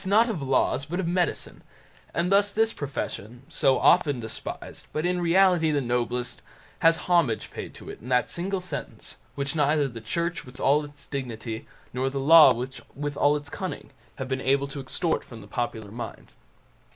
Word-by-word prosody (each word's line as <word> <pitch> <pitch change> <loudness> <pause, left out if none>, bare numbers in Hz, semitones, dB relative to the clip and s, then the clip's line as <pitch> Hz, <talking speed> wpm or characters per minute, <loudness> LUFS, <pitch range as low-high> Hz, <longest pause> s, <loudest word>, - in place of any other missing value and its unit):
not 215 +5 +4
of 190 -9 -3
laws, 135 0 +1
but 175 +5 -3
of 185 - -1
medicine; 175 0 -1 0.5
and 175 +2 0
thus 200 +1 +4
this 225 +2 +2
profession, 125 -4 -5
so 135 -1 +3
often 145 -3 +4
despised, 110 -1 -6
but 155 +2 -2
in 180 0 +1
reality 175 -1 +4
the 145 -2 +2
noblest, 125 -1 -2 0.4
has 165 0 +5
homage 170 -11 +2
paid - - -6
to - - -12
it - - -8
in 120 - -9
that 125 -1 +3
single 190 +3 -2
sentence, 180 0 -7 0.2
which 140 +1 -2
neither 150 -1 +3
the 115 -3 -8
Church 170 +10 -2
with 130 +1 -11
all 145 +3 +3
its 145 0 -10
dignity, 115 -5 -5 0.3
nor 130 +2 0
the 135 +1 -3
Law 155 0 +9
with 135 +4 -5
all 145 +1 +3
its 145 -1 -8
cunning, - - -5 0.2
have 130 - -5
been 130 0 -2
able 140 +1 +2
to 140 0 -7
extort 160 +5 -1
from 115 - -11
the 100 - -12
popular 110 -2 -3
mind. 120 +2 -8
140 Hz, 180 wpm, -26 LUFS, 125-170 Hz, 0.5 s, Law